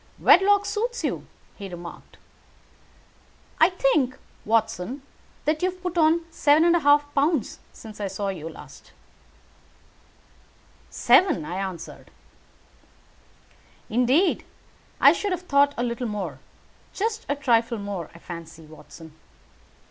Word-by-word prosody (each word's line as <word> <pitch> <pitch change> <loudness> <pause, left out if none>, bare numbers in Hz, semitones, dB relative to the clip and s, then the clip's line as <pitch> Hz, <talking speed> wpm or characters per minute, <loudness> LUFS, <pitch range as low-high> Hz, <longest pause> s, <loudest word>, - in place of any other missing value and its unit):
"Wedlock 405 +2 +5
suits 475 +4 -3
you," - - -3 0.3
he 200 -2 -7
remarked. 175 -1 -11 1.4
"I 320 - +6
think 270 -7 +1 0.3
Watson, 225 +3 -1 0.4
that 305 +1 0
you 370 - +2
have 365 0 -11
put 360 -1 -3
on 325 0 +3
seven 305 +1 +3
and 345 0 +4
a - - +3
half 290 -1 +3
pounds 290 -3 0
since 215 -2 -11
I 200 - -1
saw 195 +1 -3
you." 165 -4 -6 2.4
"Seven," 275 - +3
I 175 +4 -5
answered. 190 -4 -7 1.8
"Indeed, 255 - +2 0.6
I - - +7
should 405 -2 -2
have 360 0 -5
thought 285 -3 +3
a 240 - -1
little 240 +1 -3
more. 210 -2 -5 0.6
Just 445 +2 -2
a 285 - +1
trifle 235 -4 +1
more, 200 -5 -5
I - - -11
fancy, 165 -2 -10
Watson. 155 +1 -14
260 Hz, 120 wpm, -24 LUFS, -, 2.4 s, I